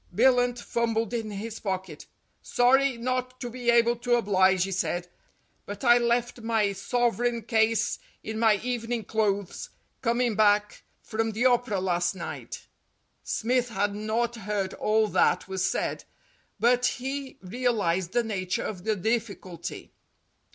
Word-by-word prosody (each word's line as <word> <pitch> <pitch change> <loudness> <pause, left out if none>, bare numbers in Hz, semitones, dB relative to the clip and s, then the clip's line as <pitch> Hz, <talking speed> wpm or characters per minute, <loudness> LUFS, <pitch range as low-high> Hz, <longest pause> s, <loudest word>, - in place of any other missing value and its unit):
Billunt 245 +1 +4
fumbled 230 -1 -1
in 225 -2 -2
his 210 +2 -6
pocket. 190 -2 -5 0.3
"Sorry 260 +1 +3
not 255 +1 -2
to 245 -2 -5
be 245 0 -2
able 235 0 +4
to 240 +1 +1
oblige," 190 -4 +3
he 195 - -3
said, 175 -1 -1 0.6
"but 205 +3 -7
I 240 -1 +6
left 240 0 0
my 220 -3 +1
sovereign 240 +3 0
case 225 0 +1 0.2
in 220 0 -4
my 225 -2 +5
evening 240 -2 -2
clothes, 205 -3 -1 0.3
coming 240 -1 +1
back 210 -1 +2 0.2
from 225 0 -2
the 230 +4 0
Opera 245 -5 +2
last 175 -1 0
night." 175 - -7 0.6
Smith 245 +2 0
had 205 -1 -1
not 225 +3 -1
heard 200 -2 -2
all 215 0 +2
that - - +2
was 190 0 0
said, - - -2 0.6
but 245 +1 +3
he 270 +1 -4
real 240 +4 -1
ized 175 -1 0
the 240 - +2
nature 185 -5 -2
of 185 -5 -5
the 220 -1 +1
difficulty. 205 -4 -4
225 Hz, 140 wpm, -27 LUFS, 200-240 Hz, 0.6 s, I